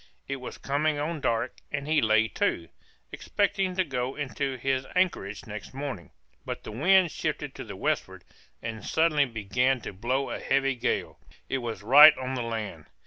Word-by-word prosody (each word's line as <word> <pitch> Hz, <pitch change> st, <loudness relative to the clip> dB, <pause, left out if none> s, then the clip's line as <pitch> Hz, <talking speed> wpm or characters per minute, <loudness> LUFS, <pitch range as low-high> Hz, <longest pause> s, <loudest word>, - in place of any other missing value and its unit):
It 140 Hz, -, -3 dB
was 125 Hz, -, -8 dB
coming 150 Hz, +2 st, 0 dB
on 155 Hz, +1 st, -3 dB
dark 115 Hz, -4 st, -1 dB
and 140 Hz, -1 st, -3 dB
he 155 Hz, -1 st, +3 dB
lay 110 Hz, 0 st, +4 dB
to, 85 Hz, -1 st, -1 dB, 0.4 s
expecting 195 Hz, -2 st, -1 dB
to 185 Hz, -, +2 dB
go 130 Hz, -4 st, -3 dB
into 140 Hz, -1 st, -3 dB
his 130 Hz, +1 st, -1 dB
anchorage 170 Hz, -, 0 dB
next 105 Hz, +4 st, -8 dB
morning, 135 Hz, -10 st, -5 dB, 0.3 s
but -, -, -6 dB
the -, -, -7 dB
wind 180 Hz, -, +4 dB
shifted -, -, -3 dB
to -, -, -7 dB
the -, -, -8 dB
westward, -, -, -2 dB, 0.4 s
and 110 Hz, -2 st, -5 dB
suddenly 160 Hz, -3 st, +2 dB
began 125 Hz, +3 st, 0 dB
to -, -, -7 dB
blow 130 Hz, +8 st, -1 dB
a -, -, -4 dB
heavy 135 Hz, 0 st, +1 dB
gale; 120 Hz, -, -2 dB, 0.3 s
it 135 Hz, -, 0 dB
was 115 Hz, -4 st, -5 dB
right 145 Hz, +7 st, +9 dB
on 130 Hz, 0 st, -4 dB
the 130 Hz, -, -2 dB
land. 110 Hz, -9 st, -5 dB
135 Hz, 175 wpm, -27 LUFS, 115-150 Hz, 0.4 s, right